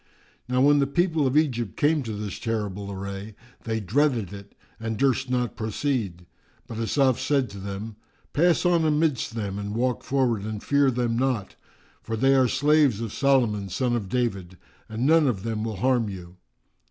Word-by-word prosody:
Now 125 0 +2
when 145 +1 +5
the 140 - +2
people 160 -1 +1
of 130 +3 +1
Egypt 120 - 0
came 150 +1 +2
to 115 -4 -5
this 105 -2 -5
terrible 105 -3 -3
array, 100 +2 -6 0.3
they 110 -1 -1
dreaded 115 - 0
it 100 0 -11 0.2
and 110 -1 -3
durst 130 0 +1
not 125 -1 -1
proceed; 110 -5 -2 0.4
but 115 - -7
Asaf 130 +3 +2
said 130 -3 0
to 100 - -9
them, 100 +2 -6 0.4
"Pass 170 +4 +3
on 175 -2 +3
amidst 150 -6 +1
them 100 -3 -3
and 105 +1 -4
walk 125 +1 0
forward 130 -6 +1
and 105 -1 -5
fear 140 -1 +3
them 120 -2 0
not: 125 -7 -1 0.5
for 115 - -4
they 135 +4 +4
are 130 -2 +4
slaves 140 -2 +3
of 115 -3 -4
Solomon 120 -8 +2
son 120 +6 0
of 105 -5 -3
David, 95 -7 -2 0.3
and 110 +3 -2
none 160 0 +5
of 100 -7 -1
them 110 -2 -2
will 110 -1 -3
harm 120 0 +1
you." 90 -2 -9
115 Hz, 180 wpm, -25 LUFS, 105-135 Hz, 0.5 s, when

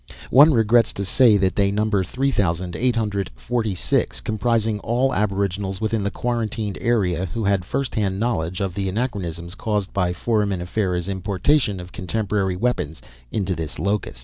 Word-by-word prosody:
One 145 +5 +8
regrets 115 -2 +3
to 100 - -4
say 115 +2 +5
that 95 -1 +1
they 100 -1 +3
number 105 -1 +1
three 135 +8 -1
thousand 90 -5 -1
eight 125 -1 +1
hundred 100 -4 -1
forty 110 - -2
six, - - 0
comprising 110 0 0
all 125 +5 +1
aboriginals 100 -1 -1
within 110 0 0
the 100 - 0
quarantined 110 -3 -2
area 95 -7 +1
who 110 +7 -4
had 100 -2 +2
first 135 +8 -2
hand 100 -3 0
knowledge 90 -6 -1
of 95 -2 -1
the 95 0 -2
anachronisms 90 -6 -3
caused 105 -2 -2
by 90 -3 +1
Foraminifera's 95 -2 -1
importation 100 - +1
of 90 +1 -9
contemporary 95 0 -1
weapons 90 -8 -1 0.3
into 95 - -1
this 80 -3 -5
locus. 100 -9 -1
100 Hz, 160 wpm, -22 LUFS, 95-115 Hz, 0.3 s, One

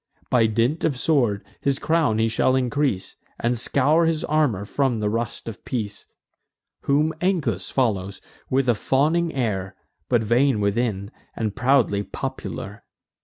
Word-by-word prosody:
By 115 -3 +4
dint 115 +8 0
of 145 -5 +1
sword 120 -8 +1 0.2
his 140 -1 +1
crown 155 -10 +1
he 110 0 +2
shall 120 +3 +2
increase, 130 -6 -1 0.2
And 120 +1 +1
scour 145 +7 +2
his 160 -1 0
armour 145 -11 +1
from 130 0 0
the 105 -1 0
rust 115 +1 -3
of 110 -4 -7
peace. 105 -5 -4 0.8
Whom 150 +3 +2
Ancus 145 - 0
follows, 100 -7 0 0.3
with 135 0 +1
a 120 - +5
fawning 155 +9 +1
air, 100 -8 -2 0.3
But 120 -3 +3
vain 120 +2 +2
within, 100 -1 -1 0.2
and 110 -3 -2
proudly 125 -5 +2
popular. - - -6
120 Hz, 140 wpm, -23 LUFS, 105-140 Hz, 0.8 s, a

